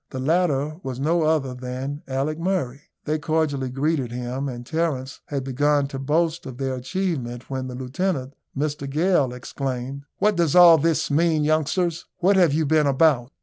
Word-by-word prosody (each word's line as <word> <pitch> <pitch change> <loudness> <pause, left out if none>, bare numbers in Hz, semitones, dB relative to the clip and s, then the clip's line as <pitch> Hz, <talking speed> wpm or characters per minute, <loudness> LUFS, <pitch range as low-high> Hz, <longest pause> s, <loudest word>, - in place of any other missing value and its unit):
The - - -7
latter 155 0 +1
was 130 -6 -5
no 165 +5 +1
other 155 -4 +1
than 130 +3 -5
Alick 140 +4 -2
Murray. 165 -7 -1 0.2
They 155 +1 0
cordially 145 -3 0
greeted 135 -1 -1
him; 125 +3 -3
and 120 -1 -7
Terence 145 -4 -2
had 140 -2 -3
begun 145 +2 +1
to 135 -2 -5
boast 160 +3 0
of 130 -2 -8
their 135 -1 -2
achievement 130 -4 -3
when 130 -1 -3
the 125 - -6
lieutenant, 135 +1 -2 0.2
Mr 145 -1 -2
Gale, 150 -3 +2
exclaimed, 130 +2 -5
"What 210 0 +2
does 170 -3 +2
all 175 -2 +9
this 165 -1 +1
mean, 160 0 +2
youngsters? 160 +3 0
What 195 +3 +3
have 175 -5 +5
you 155 +2 +1
been 155 0 +3
about?" 135 -3 +3
145 Hz, 170 wpm, -23 LUFS, 130-160 Hz, 0.2 s, all